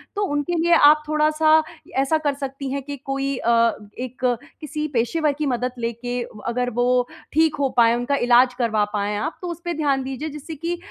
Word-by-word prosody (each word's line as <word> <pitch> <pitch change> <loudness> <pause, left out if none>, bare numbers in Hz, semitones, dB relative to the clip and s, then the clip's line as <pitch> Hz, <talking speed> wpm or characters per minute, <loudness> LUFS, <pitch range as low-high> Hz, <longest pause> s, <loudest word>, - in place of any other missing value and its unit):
तो 410 - 0
उनके 290 +4 -1
लिए 340 +1 +3
आप 300 -1 +6
थोड़ा-सा 310 +1 +4 0.4
ऐसा 275 +4 +2
कर 290 - +2
सकती 275 -1 -5
हैं 280 +1 -2
कि 285 +1 -6
कोई 275 0 -1
अ, 235 - 0 0.5
एक 255 0 -6 0.4
किसी 305 0 -3
पेशेवर 290 +6 +1
की 305 - -1
मदद 250 -2 -1
लेके, 240 +1 -3 0.3
अगर 245 +1 0
वो 250 0 +2 0.3
ठीक 320 0 +3
हो 275 -1 +2
पाए, 230 -1 +6
उनका 245 +4 0
इलाज 245 -1 +4
करवा 220 -3 +2
पाएँ 205 0 -1
आप, 215 +10 -3
तो 360 - -5
उसपे 345 +1 -4
ध्यान 285 -4 0
दीजिए, 270 +4 -4
जिससे 300 +2 -8
कि 335 +4 -3
275 Hz, 185 wpm, -22 LUFS, 245-305 Hz, 0.5 s, आप